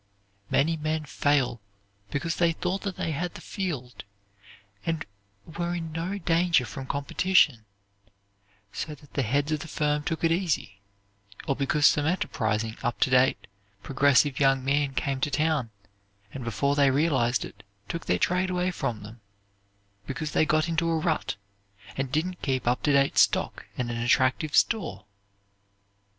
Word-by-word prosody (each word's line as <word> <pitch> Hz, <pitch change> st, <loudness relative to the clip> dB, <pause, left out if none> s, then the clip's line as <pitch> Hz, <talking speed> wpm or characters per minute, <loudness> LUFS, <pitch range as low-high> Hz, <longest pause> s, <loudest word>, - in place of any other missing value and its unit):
Many 160 Hz, +3 st, +2 dB
men 155 Hz, 0 st, -2 dB
fail 140 Hz, -5 st, +1 dB, 0.5 s
because 165 Hz, +7 st, -2 dB
they 170 Hz, -1 st, +3 dB
thought 180 Hz, +3 st, -2 dB
they 165 Hz, -, -2 dB
had 175 Hz, +4 st, -3 dB
the -, -, -7 dB
field 150 Hz, -, -5 dB, 0.8 s
and 165 Hz, -1 st, -2 dB, 0.4 s
were 175 Hz, +2 st, -3 dB
in 165 Hz, -2 st, -5 dB
no 170 Hz, +5 st, -3 dB
danger 170 Hz, -5 st, +2 dB
from 130 Hz, +4 st, -7 dB
competition, 140 Hz, -4 st, +2 dB, 1.1 s
so 150 Hz, -, -4 dB
that 145 Hz, 0 st, -20 dB
the 140 Hz, -, 0 dB
heads 140 Hz, +5 st, 0 dB
of 155 Hz, -, 0 dB
the 165 Hz, -, -7 dB
firm 150 Hz, -1 st, 0 dB
took 165 Hz, +1 st, -3 dB
it 165 Hz, -, +3 dB
easy, 160 Hz, -, -1 dB, 0.7 s
or 135 Hz, -, +1 dB
because 145 Hz, +2 st, +1 dB
some 150 Hz, 0 st, +4 dB
enterprising 110 Hz, -, -1 dB
up 120 Hz, -, -2 dB
to 130 Hz, -, +3 dB
date, 130 Hz, +1 st, +3 dB, 0.4 s
progressive 140 Hz, 0 st, +3 dB
young 135 Hz, -2 st, +3 dB
man 140 Hz, 0 st, +1 dB
came 135 Hz, 0 st, -1 dB
to 145 Hz, -, +1 dB
town, 150 Hz, -4 st, 0 dB, 0.6 s
and, 130 Hz, -, -6 dB
before 115 Hz, +5 st, 0 dB
they 140 Hz, -1 st, +4 dB
realized 130 Hz, -4 st, +2 dB
it, -, -, -12 dB, 0.3 s
took 170 Hz, -, -5 dB
their -, -, +2 dB
trade 180 Hz, +1 st, +1 dB
away 180 Hz, 0 st, 0 dB
from 115 Hz, -, -3 dB
them, 110 Hz, +2 st, -11 dB, 0.9 s
because 150 Hz, +3 st, -4 dB
they 155 Hz, -, +2 dB
got 155 Hz, +2 st, +2 dB
into 165 Hz, 0 st, 0 dB
a 165 Hz, -, +1 dB
rut, 160 Hz, -6 st, -1 dB, 0.6 s
and 135 Hz, -1 st, -3 dB
didn't 175 Hz, +5 st, -1 dB
keep 130 Hz, -4 st, -1 dB
up 125 Hz, +1 st, +2 dB
to 150 Hz, -, +2 dB
date 140 Hz, -1 st, +3 dB
stock -, -, +2 dB
and 120 Hz, -2 st, -2 dB
an 120 Hz, -, -3 dB
attractive 130 Hz, +5 st, +2 dB
store. 210 Hz, -, +1 dB
145 Hz, 155 wpm, -27 LUFS, 130-165 Hz, 1.1 s, some